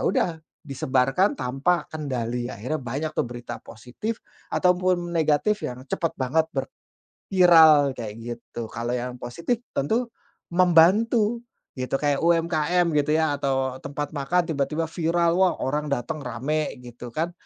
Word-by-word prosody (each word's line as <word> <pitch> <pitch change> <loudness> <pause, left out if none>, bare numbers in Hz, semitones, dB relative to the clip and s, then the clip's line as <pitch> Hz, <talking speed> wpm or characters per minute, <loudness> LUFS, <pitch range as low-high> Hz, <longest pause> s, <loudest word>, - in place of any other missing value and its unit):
udah, - - +2 0.4
disebarkan 135 +6 +1
tanpa 135 +7 0
kendali, 125 -5 -3
akhirnya 125 +10 -3
banyak, 140 +6 -3
tuh, - - +2
berita 120 -1 -7
positif 125 - -6 0.3
atau 180 0 +4
pun 185 0 +2 0.2
negatif 165 +6 +2
yang 125 +1 -5
cepat 165 +4 -1
banget 155 +5 +2
ber 135 -1 -2 0.6
viral 160 -6 +7
kayak 110 -3 -5
gitu. 120 -1 -7
Kalau 120 +1 -4
yang 125 0 -3
positif 170 - -2 0.2
tentu 230 - 0 0.4
membantu, 205 +7 +4 0.3
gitu, 130 0 -2
kayak 145 -1 0
UMKM, 170 0 +2
gitu, 150 +1 0
ya, 160 -2 +2
atau, 135 -2 -1
eee, - - -13
tempat 145 +1 -4
makan 160 +5 +1
tiba-tiba 150 +3 -1
viral, 170 +1 +1
wah, 185 -1 +4
orang 150 +3 -1
dateng 140 +3 -2
rame, 150 +4 -2
gitu, 120 0 -9
kan. 165 +8 -2
150 Hz, 140 wpm, -24 LUFS, 130-170 Hz, 0.6 s, viral